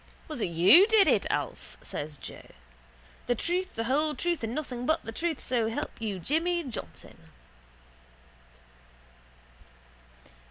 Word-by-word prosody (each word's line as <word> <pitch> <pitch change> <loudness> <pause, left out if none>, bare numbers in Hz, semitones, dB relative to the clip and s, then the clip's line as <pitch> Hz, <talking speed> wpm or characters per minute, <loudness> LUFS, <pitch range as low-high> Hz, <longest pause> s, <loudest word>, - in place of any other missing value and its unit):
—Was 305 -7 -6
it - - +1
you 180 - +7
did 440 -3 +5
it, - - +2
Alf? - - -4
says 145 0 -5
Joe. - - -10 0.8
The 245 - +2
truth, 355 +9 -2
the 225 - -2
whole 295 +5 0
truth 345 -6 -2
and 225 +2 -3
nothing 250 -5 -4
but 315 +1 +1
the 225 - -5
truth, 325 +4 -2
so 235 -3 0
help 225 - -5
you 210 -4 -3
Jimmy 335 - 0
Johnson. 220 - -9
260 Hz, 130 wpm, -28 LUFS, 225-335 Hz, 0.8 s, you